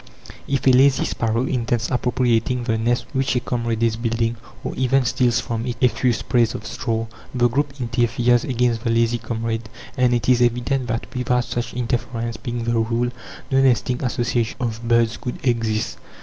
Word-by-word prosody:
If 135 0 -1
a 130 - +7
lazy 135 +2 +5
sparrow 115 +2 0
intends 120 -3 -1
appropriating 125 0 +1
the 115 -2 0
nest 120 +1 0
which 135 0 0
a - - +3
comrade 115 -2 -2
is 115 -1 +1
building, 115 0 0 0.3
or - - -3
even 130 0 +2
steals 120 -1 +2
from 115 -1 -3
it 120 - -2
a 125 - +5
few 125 +1 +1
sprays 115 0 +1
of - - -7
straw, 115 -2 -2 0.3
the 120 -1 +4
group 140 +3 -2
interferes 120 0 +2
against 120 -3 0
the 120 - 0
lazy 115 +1 +2
comrade; 115 0 -3 0.3
and 125 -1 +3
it 115 -3 -2
is 125 -1 +4
evident 125 +2 +1
that 115 +1 -2
without 125 0 +1
such 120 -1 -4
interference 120 -1 -2
being 120 -3 -4
the 120 0 0
rule, 115 +2 0 0.4
no 135 0 +4
nesting 125 0 +2
associations 120 -2 -1
of 115 -2 -3
birds 115 -1 +3
could 125 - -5
exist. 115 -3 0
120 Hz, 180 wpm, -22 LUFS, 115-125 Hz, 0.4 s, a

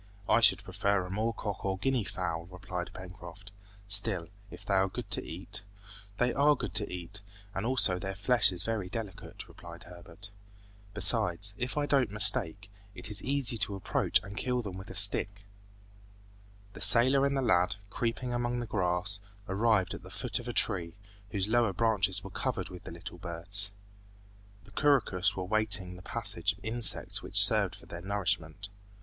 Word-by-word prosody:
"I 115 +2 +3
should - - +4
prefer 100 -2 -1
a 90 - -8
moor 110 +4 -1
cock 105 -3 -6
or 95 -1 -2
guinea 125 +1 -1
fowl," 85 -3 -5
replied 90 -1 -7
Pencroft, 95 +1 -12 0.4
"still, 100 -4 -1 0.2
if - - -13
they 100 - -2
are 95 0 +2
good - - -8
to - - +1
eat 100 +5 -7 0.3
" 100 0 -18
"They 125 0 0
are 145 +2 +3
good - - -6
to 105 -1 -3
eat, 90 +3 -5 0.3
and 100 +4 -3
also 115 -8 +2
their 95 +1 -5
flesh 105 +1 +2
is 90 -1 -5
very 105 -4 -3
delicate," 110 -2 -8
replied 85 -1 -13
Herbert. 90 +3 -12 0.6
"Besides, 95 -1 +4
if 125 +7 -5
I 145 - 0
don't 135 -5 +1
mistake, 105 -1 +7 0.2
it 105 - -2
is 105 - +2
easy 135 -3 0
to 100 -1 -1
approach 95 - +1
and 100 0 -10
kill 125 +1 -2
them 100 -4 -7
with 95 +2 -10
a - - -9
stick." 100 0 +2 1.3
The - - -12
sailor 130 +3 +5
and 140 0 0
the 135 - -1
lad, 90 -6 +2 0.2
creeping 120 +3 -3
among 120 0 -2
the 120 - -4
grass, 95 -1 -2 0.3
arrived 100 -1 +1
at - - -8
the - - -13
foot - - -4
of - - -10
a - - -3
tree, 85 -2 0 0.3
whose 100 -2 0
lower 115 -2 +1
branches 105 -2 0
were 95 - -9
covered 110 -4 -4
with 90 -1 -12
little 85 +1 -10
birds. 95 +4 -1 0.9
The 105 - -19
couroucous 100 -8 +1
were 95 - -4
waiting 100 -2 +2
the 90 - -12
passage 90 +1 -1
of 100 +2 -17
insects 115 -1 +1
which - - -8
served - - +7
for - - -17
their 85 - -9
nourishment. 95 -2 -3
100 Hz, 180 wpm, -29 LUFS, 90-110 Hz, 1.3 s, mistake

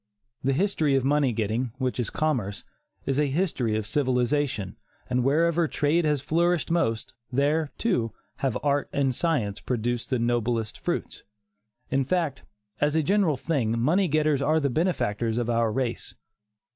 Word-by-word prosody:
The 135 +1 +2
history 160 -3 +1
of 135 - +2
money 140 -1 +2
getting, 110 +2 -1
which 130 -1 -2
is 120 - -1
commerce, 120 -11 -1 0.4
is 135 +1 0
a 150 - +3
history 135 - 0
of 110 - -3
civilization, 125 -4 0 0.3
and 125 0 +1
wherever 165 +4 +3
trade 155 +3 +1
has 150 -3 +1
flourished 170 +2 +1
most, 115 -10 0 0.2
there, 145 +4 +1
too, 125 - 0 0.3
have 135 -4 0
art 145 -1 +1
and 135 -2 +1
science 120 - 0
produced 120 -1 -2
the 130 - +1
noblest 115 -2 -1
fruits. - - -3 0.7
In 135 +1 +2
fact, 160 -2 -1 0.4
as 145 +1 +1
a 160 - +3
general 190 -4 +2
thing, 125 -5 0
money 175 +10 +3
getters 155 -2 +2
are 155 +3 +3
the 140 -3 0
benefactors 120 - 0
of 120 -1 0
our 115 -1 +2
race. 120 0 -3
135 Hz, 155 wpm, -26 LUFS, 120-155 Hz, 0.7 s, a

